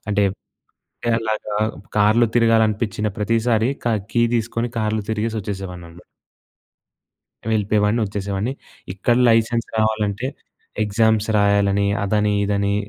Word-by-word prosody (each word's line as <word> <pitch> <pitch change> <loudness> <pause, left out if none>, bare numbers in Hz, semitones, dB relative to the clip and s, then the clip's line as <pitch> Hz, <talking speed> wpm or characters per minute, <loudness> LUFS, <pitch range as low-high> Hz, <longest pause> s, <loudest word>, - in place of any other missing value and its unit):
అంటే 105 0 +2
అంటే 95 - -11 0.7
అలాగా 110 -1 -3 0.4
కార్‌లో 110 +3 +4
తిరగాలనిపిచ్చిన 110 -2 +2
ప్రతిసారి 115 +2 +1 0.2
క - - +3 0.2
కీ 120 - +2
తీసుకొని 115 +1 -1
కార్‌లో 110 0 0
తిరిగేసి 110 +1 -2
వచ్చేసేవాడిని 95 -3 -6
అన్నమా 85 +2 -15 1.5
వెళ్ళిపోయేవాడిని, 105 +1 +1
వొచ్చేసేవాడిని. 100 +4 -3 0.4
ఇక్కడ 120 +5 +1
లైసెన్స్ 115 +1 +1
రావాలంటే, 110 +1 0 0.6
ఎగ్జామ్స్ 110 +1 +2
రాయాలని, 100 0 +2 0.2
అదని, 105 +1 +1
ఇదని, 100 0 0
105 Hz, 100 wpm, -21 LUFS, 100-115 Hz, 1.5 s, కార్‌లో